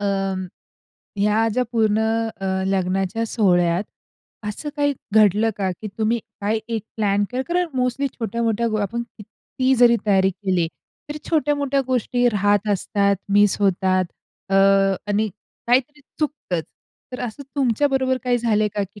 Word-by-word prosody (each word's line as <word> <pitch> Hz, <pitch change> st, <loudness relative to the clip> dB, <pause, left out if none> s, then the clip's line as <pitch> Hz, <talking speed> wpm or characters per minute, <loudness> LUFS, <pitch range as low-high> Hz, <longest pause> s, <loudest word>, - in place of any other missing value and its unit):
अं, 195 Hz, -2 st, -1 dB, 0.7 s
ह्या 210 Hz, +2 st, +2 dB
ज्या 250 Hz, +3 st, 0 dB
पूर्ण 220 Hz, -2 st, +2 dB, 0.4 s
अ, 195 Hz, -, -3 dB, 0.2 s
लग्नाच्या 195 Hz, +3 st, 0 dB
सोहळ्यात 175 Hz, -4 st, +2 dB, 0.6 s
असं 295 Hz, +8 st, -5 dB
काही 285 Hz, -1 st, +1 dB, 0.2 s
घडलं 215 Hz, +1 st, +4 dB
का, 190 Hz, -2 st, -1 dB
की -, -, -4 dB
तुम्ही 225 Hz, +2 st, +1 dB, 0.2 s
काय 215 Hz, +2 st, 0 dB
एक 225 Hz, -2 st, -2 dB
प्लॅन 205 Hz, -1 st, +1 dB
करा 255 Hz, +1 st, -2 dB
कारण 355 Hz, +1 st, +1 dB
मोस्टली 250 Hz, +2 st, 0 dB
छोट्या-मोठ्या 230 Hz, -1 st, -1 dB, 0.2 s
आपण 235 Hz, +4 st, -2 dB, 0.2 s
किती 255 Hz, +5 st, -2 dB
जरी 240 Hz, -1 st, +5 dB
तयारी 190 Hz, -1 st, +4 dB
केली, 185 Hz, -3 st, -1 dB, 0.4 s
तर 295 Hz, -, -5 dB
छोट्या-मोठ्या 285 Hz, -3 st, +1 dB
गोष्टी 245 Hz, -1 st, +1 dB
राहत 205 Hz, -1 st, +1 dB
असतात, 200 Hz, 0 st, +1 dB, 0.2 s
मिस 205 Hz, -1 st, +4 dB
होतात. 185 Hz, -1 st, +2 dB, 0.4 s
अ, 195 Hz, -, 0 dB, 0.6 s
आणि 215 Hz, +2 st, +1 dB, 0.4 s
काहीतरी 265 Hz, +5 st, +1 dB, 0.2 s
चुकतच. 280 Hz, -, -2 dB, 0.5 s
तर 250 Hz, -, -5 dB
असं 245 Hz, +3 st, -5 dB
तुमच्या 270 Hz, +1 st, +2 dB
बरोबर 260 Hz, -1 st, +1 dB
काही 245 Hz, -1 st, +2 dB
झालंय 215 Hz, -2 st, +1 dB
का? 205 Hz, -, 0 dB
की 200 Hz, +2 st, -9 dB
215 Hz, 140 wpm, -22 LUFS, 200-250 Hz, 0.7 s, जरी